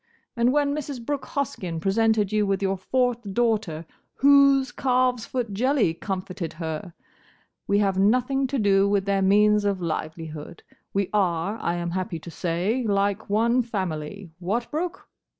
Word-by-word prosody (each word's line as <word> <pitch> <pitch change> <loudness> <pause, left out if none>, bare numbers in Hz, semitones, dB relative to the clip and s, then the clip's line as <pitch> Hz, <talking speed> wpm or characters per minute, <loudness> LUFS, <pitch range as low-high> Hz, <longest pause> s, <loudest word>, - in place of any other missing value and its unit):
And 235 +1 +3
when 285 0 +2
Mrs. 280 -5 -5
Brooke 285 -1 -3
Hoskyn 195 - -3
presented 210 +2 +2
you 210 -1 +1
with 195 0 0
your 195 0 +1
fourth 245 +5 0
daughter, 215 -9 0 0.3
whose 275 -2 +5
calves 250 -2 +1
foot 240 -5 -3
jelly 250 - +2
comforted 185 -2 -5
her? 160 +1 -5 0.7
We 200 - +3
have 195 -2 +1
nothing 255 +6 +2
to 275 +1 -2
do 200 -3 +3
with 200 -1 +1
their 200 -1 +1
means 210 +2 +4
of 200 -2 0
livelihood; 160 -1 -5 0.3
we 195 -1 -1
are, 195 +1 0
I 170 - -1
am 170 0 -3
happy 180 -1 -3
to 170 +2 -10
say, 180 +10 -1
like 200 0 0
one 230 +4 +3
family. 190 -5 -4
What, 215 +7 -2
Brooke?" 345 +4 -4
205 Hz, 150 wpm, -25 LUFS, 185-245 Hz, 0.7 s, whose